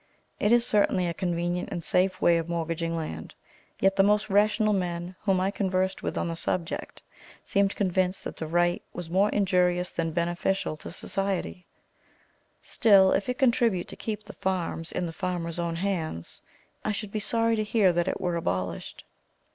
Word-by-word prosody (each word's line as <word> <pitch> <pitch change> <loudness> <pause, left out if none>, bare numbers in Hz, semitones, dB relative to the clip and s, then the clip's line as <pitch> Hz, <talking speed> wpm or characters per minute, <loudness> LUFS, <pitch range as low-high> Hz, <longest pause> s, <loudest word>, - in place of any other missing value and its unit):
It 210 - +2
is 240 0 +5
certainly 200 -4 +2
a 170 - -1
convenient 175 0 -2
and 175 -3 -4
safe 185 +3 +1
way 170 -1 +4
of 165 +1 -5
mortgaging 165 0 -2
land; 80 - -6 0.4
yet 195 0 +3
the 195 - +5
most 210 +1 +2
rational 210 +1 +3
men 175 -1 -2
whom 195 -3 +2
I 190 +1 +1
conversed 190 -1 -1
with - - -3
on - - -1
the 165 - -3
subject 165 0 -3 0.4
seemed 200 0 +1
convinced 185 -1 0
that - - -6
the 160 - -5
right 175 +2 +1
was 170 -2 -6
more 195 +3 +3
injurious 180 -3 +2
than 165 -1 -1
beneficial 175 +1 -1
to - - -9
society; 190 -1 -3 1.0
still 195 -4 +5
if 200 - 0
it 250 - -1
contribute 235 -8 +2
to - - -7
keep 215 -1 -5
the 225 - -11
farms 175 -3 -2
in 180 - -2
the 165 - -5
farmers' 175 -1 -3
own 170 -1 -1
hands, 165 - -3 0.4
I 215 - 0
should 210 0 -4
be 215 - -2
sorry 230 +2 +2
to 215 - 0
hear 210 -4 +3
that 175 +1 0
it - - -1
were 175 -2 -1
abolished. 90 - -3
185 Hz, 180 wpm, -27 LUFS, 170-200 Hz, 1.0 s, is